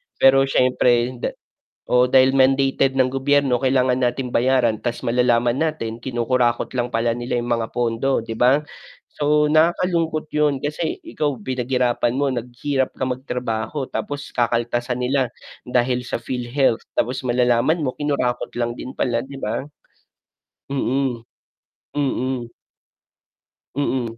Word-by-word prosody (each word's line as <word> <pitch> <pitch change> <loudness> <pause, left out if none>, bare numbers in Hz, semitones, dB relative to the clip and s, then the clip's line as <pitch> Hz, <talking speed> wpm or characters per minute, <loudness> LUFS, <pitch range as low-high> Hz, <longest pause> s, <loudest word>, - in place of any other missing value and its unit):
pero 135 0 +5
siyempre 125 -2 +2
da - - -3 0.5
oo, 125 0 +4
dahil 130 +1 +4
mandated 135 0 +3
ng 130 - +4
gobyerno 135 -1 +2
kailangan 130 -1 +3
natin 125 0 -1
bayaran 120 -3 +2
ta's 120 -1 -3
malalaman 120 0 +2
natin 120 -8 -2
kinukurakot 120 -1 0
lang 120 0 -1
pala 115 +1 +1
'yung 120 0 -2
mga 115 -1 -1
pondo 120 +2 0
'di 115 0 -6
ba? 130 +5 +4 0.5
So 150 0 +2
nakakalungkot 160 0 +2
'yun, 150 -2 +2
kasi 155 +2 -2
ikaw 145 - -2
pinaghirapan 125 0 0
mo, 140 - +2
naghirap 130 +3 -2
ka 130 - 0
magtrabaho 125 0 -3
tapos 145 -1 -5
kakaltasan 120 +1 0
nila 130 -2 +1 0.4
dahil 125 0 +1
sa 125 - -3
PhilHealth, 125 +1 0 0.2
tapos 125 +3 0
malalaman 125 +5 +2
mo 130 - -2
kinurakot 140 -4 -1
lang 120 0 -1
din 125 - -7
pala 120 -2 0
'di 135 0 -9
ba? 110 +1 -2 1.1
Mm. 130 -3 -1 0.7
Mm. 130 -4 -1 1.2
Mm. 125 -5 -1
125 Hz, 125 wpm, -21 LUFS, 120-135 Hz, 1.2 s, pero